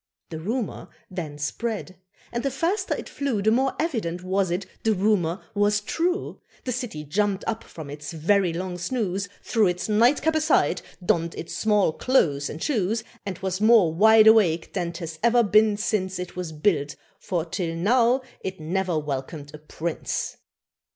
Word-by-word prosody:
The 160 - -5
rumour 225 +7 -3 0.2
then 160 -6 -5
spread, 190 +5 -3 0.4
and 235 - -2
the 275 - 0
faster 335 - -1
it - - -7
flew, 260 -8 -2
The 220 - +4
more 265 +3 +2
evident 210 - -2
was 190 0 0
it 180 +3 -2 0.2
the 220 -1 +2
rumour 190 -2 +1
was 205 0 +2
true. 345 - -2 0.2
The 255 - -1
city 235 -11 -4
jumped 200 +6 0
up 225 0 -2
from 160 -3 -10
its 150 +1 -7
very 175 +3 +2
long 180 +1 -4
snooze, 200 -1 -2
Threw 220 -4 +2
its 180 0 -2
nightcap 240 +9 +3
aside, 315 0 +2 0.2
donned 170 -4 +1
its 170 - -6
small 210 -6 +2
clothes 150 - +1
and 155 - -6
shoes, 220 -4 0 0.2
And 185 -3 -3
was 190 +1 -2
more 215 -7 +5
wide 220 +4 +6
awake 195 -7 +4
than't 170 -1 -2
has 160 -2 -7
ever 235 +1 +4
been 215 0 +4
since 205 -4 -1
It 180 0 -6
was 180 -3 -4
built 150 -2 0 0.2
for 175 -5 -2
till 165 -1 -3
now 240 +8 +3 0.2
it 190 -2 -4
ne'er 175 +2 -1
welcomed 145 0 -4
a 150 - -9
Prince! 155 +2 -4
195 Hz, 165 wpm, -25 LUFS, 170-225 Hz, 0.4 s, wide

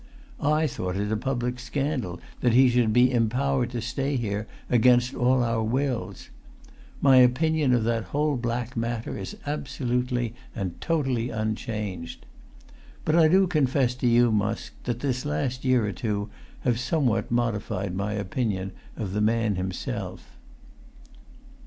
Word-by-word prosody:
I 150 +1 +2
thought 90 -10 -3
it 105 +2 -1
a - - +2
public 125 +1 -2
scandal 125 - -2 0.2
that 120 -2 +2
he 130 +1 +6
should 120 -2 +2
be 125 +3 +5
empowered 125 +2 +1
to 120 -2 -4
stay 135 +4 -1
here 105 -3 -2 0.2
against 125 +1 +4
all 125 +1 +2
our 115 -1 0
wills. 125 +2 -2 0.7
My 135 -2 +6
opinion 145 +3 +4
of 120 - +1
that 115 0 0
whole 150 0 0
black 120 0 -3
matter 115 0 -2
is 95 -2 -6
absolutely 125 -4 -2 0.2
and 95 -6 -4
totally 135 -8 0
unchanged. 110 -5 -4 0.8
But 155 - +2
I 165 -2 +6
do 190 +4 +5
confess 135 -7 +2
to 125 - 0
you, 120 0 +5
Musk, 105 +1 -1
that 120 -1 -2
this 130 -3 -1
last 120 - -2
year 130 -4 +3
or 105 - -1
two 105 -3 -3 0.3
have 120 -2 +1
somewhat 125 -4 0
modified 105 -5 -1
my 100 +2 -2
opinion 100 -2 -2 0.3
of 100 -4 -4
the 105 - 0
man 110 0 +2
himself." 90 0 -5
120 Hz, 145 wpm, -26 LUFS, 110-130 Hz, 0.8 s, he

